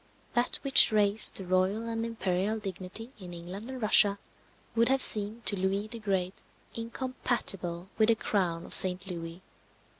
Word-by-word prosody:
That 240 +1 0
which 275 -4 +6
raised 210 0 +4
the 190 - -5
royal 185 +5 -1
and 225 0 -3
imperial 210 -2 -2
dignity 200 +3 -7
in 180 -2 -9
England 185 +7 -9
and 260 -1 -7
Russia 210 -2 +4 0.6
would 230 +1 +2
have 270 0 +2
seemed 215 -1 +2
to 205 - +3
Louis 195 +2 -2
the 230 0 -7
Great 190 -3 -3 0.3
incompatible 230 -7 -3
with 215 - +4
the 230 - +4
crown 180 -6 -2
of - - -4
St. 185 +1 +4
Louis. 170 +1 -8
205 Hz, 155 wpm, -28 LUFS, 185-230 Hz, 0.6 s, which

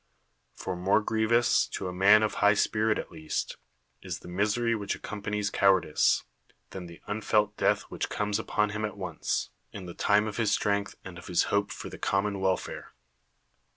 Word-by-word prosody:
For 95 - -4
more 95 +4 +3
grievous, 110 +2 +2
to 95 - -5
a 90 - -4
man 100 +4 +6
of 110 - 0
high 105 +1 +5
spirit 110 +1 +1
at - - -6
least, 80 -2 -4 0.4
is - - -5
the - - -12
misery 105 +6 +1
which 100 -3 -2
accompanies 105 -1 -3
cowardice, 95 -6 +3 0.5
than 95 -2 -7
the 85 0 -13
unfelt 105 0 0
death - - +2
which - - -5
comes 105 0 -1
upon 105 -1 0
him 110 +1 -4
at 105 -1 -3
once, 95 -2 -3 0.2
24 - - -34
PERICLES - - -6
in 95 - -9
the 85 - -7
time 105 +1 +4
of 105 - -5
his 110 -3 +1
strength 100 -1 0
and 90 -2 -8
of 90 - -12
his 90 -3 +2
hope 100 0 +1
for - - -7
the - - -9
common 100 0 0
welfare. 95 -1 -2
100 Hz, 190 wpm, -28 LUFS, 95-105 Hz, 0.5 s, man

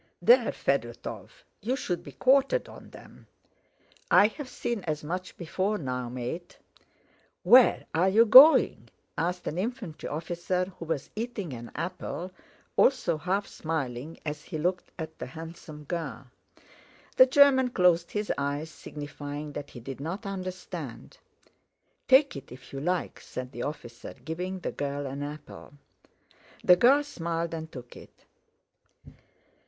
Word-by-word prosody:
"There, 485 - +5
Fedótov, - - -3 0.3
you 240 +5 0
should 180 -9 -3
be - - -11
quartered 275 - +3
on - - -12
them!" - - -15 0.8
"I 205 - +6
have 270 +3 -8
seen 235 -6 -3
as 155 -2 -2
much 180 +4 -5
before 190 +5 -1
now, 125 -5 -3
mate!" 125 +8 -6 0.9
"Where 250 0 +6
are 180 +4 +3
you 220 +4 +6
going?" 265 +8 +8 0.3
asked 180 +2 -2
an 165 - -3
infantry 215 -6 -4
officer 175 +4 -2
who 165 - -6
was 155 -4 -3
eating 215 - -4
an 120 -1 -8
apple, 180 +1 -4 0.4
also 255 -11 +3
half 185 +6 -1
smiling 155 -4 -4
as 150 -1 -5
he - - -5
looked 180 +4 -1
at 160 -1 -7
the - - -5
handsome 160 -2 -10
girl. 145 -6 -5 0.9
The 255 - +9
German 260 -1 +5
closed 180 -6 +3
his 210 0 -1
eyes, 145 +3 -2
signifying 145 0 -7
that 145 0 -6
he 120 - -10
did 135 +3 -8
not 180 +10 -5
understand. 185 - -6 0.9
"Take 275 +2 +5
it 140 -2 -9
if 125 +2 -13
you 135 - -4
like," 180 +4 -2
said 125 0 -7
the 120 - -7
officer, 120 -4 -6
giving 180 +7 -5
the - - -3
girl 145 0 -3
an 135 +1 -5
apple. 145 -1 -8 0.9
The 180 - +8
girl 270 +9 +5
smiled 170 - -3
and 160 0 -6
took 125 -2 -10
it. - - -15
170 Hz, 140 wpm, -28 LUFS, 145-200 Hz, 0.9 s, The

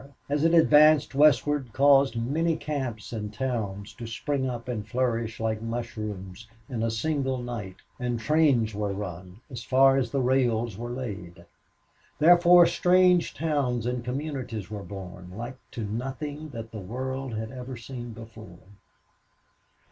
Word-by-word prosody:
as 145 +1 0
it 165 - +4
advanced 155 -3 +6
westward 145 -2 +3
caused 140 -2 +5
many 155 +8 0
camps 130 -8 -4
and 105 -2 -4
towns 105 -4 -3
to 120 - -8
spring 130 +3 -2
up 120 -1 -6
and 110 -4 -4
flourish, 115 -1 -1
like 110 -1 -1
mushrooms, 110 -3 -5 0.2
in 120 -4 -4
a 115 - +1
single 135 +3 -1
night; 120 -7 -6 0.2
and 120 -1 -2
trains 135 -5 +2
were 105 -1 -2
run 95 -1 -7
as 120 -2 -6
far 135 +4 +5
as 125 -3 0
the 135 - -1
rails 120 -4 +1
were 120 +3 -6
laid. 95 -9 -6 0.7
Therefore 175 +2 +7
strange 180 0 +3
towns 140 -7 -1
and 125 0 -2
communities 125 -5 -4
were 105 -1 -5
born, 90 -1 -9
like 120 +3 -6
to 115 - -5
nothing 135 +8 -5
that 115 -4 -8
the 110 - -6
world 130 +4 -4
had 110 +1 -4
ever 130 -1 -7
seen 120 +1 -8
before. 110 -5 -11
120 Hz, 145 wpm, -27 LUFS, 110-140 Hz, 0.7 s, Therefore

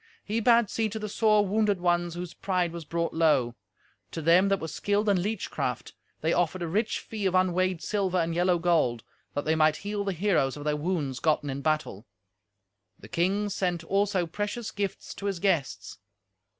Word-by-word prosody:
He 215 +2 -1
bade 235 -1 +4
see 220 +2 -1
to 215 - -5
the 215 -1 -4
sore 210 0 +3
wounded 205 -1 +1
ones 175 -1 +1
whose 175 -1 -6
pride 180 -3 -1
was 170 -1 -7
brought 170 +1 -2
low. 150 -7 +2 0.6
To - - -6
them 175 +5 +5
that 195 -1 +2
were 160 - -4
skilled 205 +6 -1
in 195 -3 +3
leech 210 +1 -3
craft - - -3 0.3
they 160 +2 +1
offered 175 +1 0
a - - -2
rich 215 +7 0
fee 210 -3 -3
of 185 - 0
unweighed 185 -1 +1
sliver 195 -3 0
and 165 -1 0
yellow 175 +1 +2
gold, 160 -9 +1 0.3
that 145 - -2
they 155 - +2
might 155 -1 +3
heal 205 0 -2
the 195 -1 -1
heroes 165 -7 +1
of 145 - -7
their 150 0 0
wounds 150 -5 -2
gotten 150 -3 +1
in 135 +1 -4
battle; 150 -8 -2 0.9
the 105 - -13
king 195 - +1
sent 180 -3 -1
also 195 0 +1
precious 205 +7 -4
gifts 200 -2 -4
to 200 - -5
his 195 -2 -1
guests. 140 - -1
180 Hz, 190 wpm, -27 LUFS, 160-200 Hz, 0.9 s, them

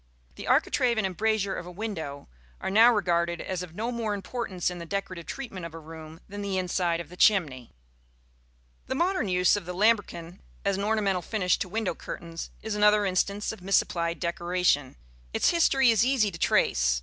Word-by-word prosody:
The - - -9
architrave 240 -2 +2
and 220 - +1
embrasure 200 +1 0
of 175 - -6
a - - -8
window 175 -8 -5 0.3
are - - -3
now 225 +4 +7
regarded 170 -5 +1
as 185 -1 -4
of 175 -2 -9
no 230 +4 -2
more 225 -3 -2
importance 195 -3 -3
in 175 - -7
the 170 - -6
decorative 185 -2 -4
treatment 225 -10 -6
of 165 -1 -7
a - - -7
room 160 +1 -11
than 205 +1 -7
the 200 -2 -2
inside 180 -2 0
of 170 - -7
the 180 - -11
chimney. 155 - +2 1.2
The 260 - -2
modern 345 - +1
use 180 0 +3
of 205 - -4
the 180 - -5
lambrequin 195 -4 +1 0.3
as 200 -1 +2
an 200 - -3
ornamental 205 -4 +1
finish 185 -2 0
to 185 - -3
window 220 0 -1
curtains 165 -1 -7
is 220 -1 -3
another 210 0 +4
instance 200 +2 0
of 220 -4 -10
misapplied 170 -3 +1
decoration. 175 -5 0 0.4
Its - - +3
history 270 -7 +4
is 225 0 +3
easy 250 -5 +2
to 165 - -9
trace. - - +2
190 Hz, 185 wpm, -27 LUFS, 170-215 Hz, 1.2 s, now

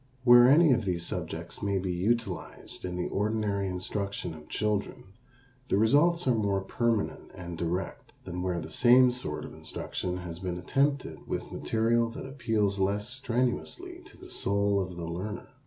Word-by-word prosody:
Where 120 -1 +8
any 155 +2 +6
of 120 -2 +1
these 90 -3 -2
subjects - - -5
may 100 -1 0
be 95 -1 -1
utilized 105 +5 -2
in 90 -1 -4
the 90 - -2
ordinary 105 -1 0
instruction 95 -1 -3
of 75 -1 -13
children 105 -2 -2 0.6
the - - +3
results 145 - +3
are 125 - +5
more 100 -3 +1
permanent 115 +2 -1
and 85 -1 -7
direct 85 +3 -3
than 90 -1 -5
where 90 -1 -1
the 80 0 -7
same 125 +1 +6
sort 120 -12 -3
of - - -10
instruction 90 0 -4
has 85 -2 -7
been 90 -1 -3
attempted 140 - -1
with - - -4
material 115 +1 +1
that - - -7
appeals 110 -7 0
less 100 +2 0
strenuously 135 - -2
to 400 - -16
the 370 0 -13
soul 100 0 +1
of 90 -2 -3
the 85 - -4
learner. 90 +6 -5
100 Hz, 165 wpm, -29 LUFS, 90-120 Hz, 0.6 s, Where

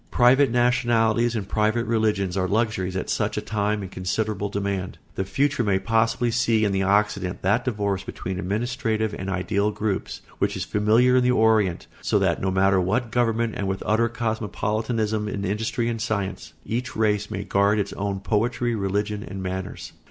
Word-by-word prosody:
Private 130 +2 +5
nationalities 120 -1 +2
and 100 -3 -3
private 110 +3 +1
religions 105 -5 0
are 95 -1 0
luxuries 100 -3 0
at 95 - -2
such - - -1
a - - +2
time 105 -1 -1
in 95 - -6
considerable 100 +2 -2
demand. 100 -2 -3 0.2
The 95 - -2
future 140 +5 +1
may 100 -3 +2
possibly 115 +4 +1
see 115 -2 +2
in 100 - +1
the 95 0 0
Occident 100 -1 +1
that 105 +7 +2
divorce 100 -5 -1
between 95 -1 -5
administrative 110 +2 -1
and 95 -1 -5
ideal 100 +2 0
groups 105 -2 -3 0.2
which - - 0
is - - -3
familiar 115 +5 +3
in 125 - +4
the 125 - +3
Orient; 110 -6 +3 0.2
so - - +1
that - - +2
under 95 - -2
no - - +2
matter 95 0 +3
what 110 +6 0
government 115 -2 +1
and 100 - -2
with 95 0 -3
utter 115 +2 +2
cosmopolitanism 110 -1 -1
in 100 -1 -3
industry 110 +4 -1
and 115 -2 -2
science, 100 -4 -3
each 120 +2 -3
race 105 -1 +1
may 100 -2 -4
guard 100 +2 +2
its 100 - -2
own 100 -1 -3
poetry, 120 +3 0
religion, 105 0 -1
and 95 -3 -7
manners. 95 0 -5
105 Hz, 180 wpm, -24 LUFS, 100-115 Hz, 0.2 s, Private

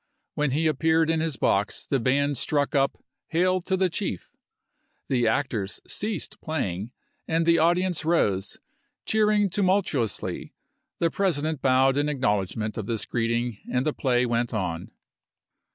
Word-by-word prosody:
When 150 -1 0
he 150 +5 0
appeared 160 +2 +2
in 165 - +1
his 160 -3 -1
box 100 +1 0
the 135 - 0
band 140 +4 +1
struck 145 +2 0
up 135 -1 +1
" - - -60
Hail 185 +1 +3
to 190 +2 -1
the 190 0 +3
Chief," 170 - -4 0.8
the 120 -3 +2
actors 110 -6 -1
ceased 210 -4 -3
playing, 110 - -3 0.4
and 165 0 +1
the 170 0 +4
audience 175 +2 +2
rose, 105 - +1 0.5
cheering 210 -1 +3
tumultuously; 185 - -1 0.4
the 165 -1 +1
President 160 -6 0
bowed 130 +1 +3
in 145 +1 +1
acknowledgment 110 -5 -1
of 105 - -5
this 115 -2 -2
greet 115 -1 -1
ing 115 -2 -1
and 125 +2 0
the 155 - +1
play 125 -2 +1
went 120 -1 -1
on. 85 -5 -3
140 Hz, 150 wpm, -26 LUFS, 115-165 Hz, 0.8 s, the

